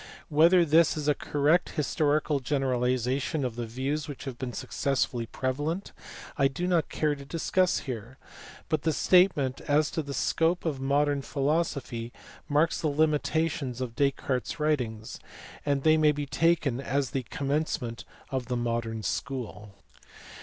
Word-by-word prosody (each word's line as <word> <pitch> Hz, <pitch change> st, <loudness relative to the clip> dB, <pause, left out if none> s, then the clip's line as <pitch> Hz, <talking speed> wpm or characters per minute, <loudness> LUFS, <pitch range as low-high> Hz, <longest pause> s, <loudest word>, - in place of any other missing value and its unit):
Whether 170 Hz, +3 st, +5 dB
this 160 Hz, +1 st, +4 dB
is 150 Hz, -1 st, -3 dB
a 150 Hz, -, +5 dB
correct 150 Hz, +5 st, +1 dB
historical 150 Hz, -1 st, +1 dB
generalization 130 Hz, +1 st, 0 dB
of 120 Hz, -3 st, -3 dB
the 120 Hz, -1 st, -4 dB
views 135 Hz, +6 st, -2 dB
which 145 Hz, -3 st, -7 dB
have 130 Hz, -3 st, -6 dB
been 130 Hz, -2 st, -3 dB
successively 125 Hz, -2 st, -1 dB
prevalent 145 Hz, -, -2 dB, 0.5 s
I 135 Hz, -, +5 dB
do 135 Hz, +6 st, -4 dB
not 175 Hz, -4 st, +1 dB
care 150 Hz, -1 st, 0 dB
to 140 Hz, -1 st, -8 dB
discuss 175 Hz, +5 st, +1 dB
here, 125 Hz, -1 st, -6 dB, 0.5 s
but 155 Hz, -3 st, 0 dB
the 160 Hz, +1 st, +1 dB
statement 150 Hz, -8 st, +3 dB
as 150 Hz, +1 st, +3 dB
to 160 Hz, -, -1 dB
the 140 Hz, -2 st, -6 dB
scope 165 Hz, +7 st, +1 dB
of 150 Hz, -5 st, -1 dB
modern 140 Hz, +1 st, +2 dB
philosophy 135 Hz, -5 st, -1 dB, 0.4 s
marks 150 Hz, +3 st, +2 dB
the 160 Hz, -, +1 dB
limitations 150 Hz, -3 st, 0 dB
of 125 Hz, -3 st, -4 dB
Descartes 140 Hz, -2 st, 0 dB
s -, -, -15 dB
writings, 125 Hz, -8 st, -1 dB, 0.5 s
and 140 Hz, -1 st, +1 dB
these 155 Hz, 0 st, +5 dB
may 155 Hz, -1 st, +5 dB
be 145 Hz, 0 st, -3 dB
taken 150 Hz, -3 st, +1 dB
as 140 Hz, -2 st, -1 dB
the 135 Hz, -, -1 dB
commencement 135 Hz, -3 st, -2 dB, 0.3 s
of 130 Hz, -2 st, -2 dB
the 125 Hz, -1 st, -1 dB
modern 115 Hz, -2 st, -2 dB
school. 110 Hz, -7 st, -4 dB
140 Hz, 150 wpm, -28 LUFS, 125-155 Hz, 0.5 s, Whether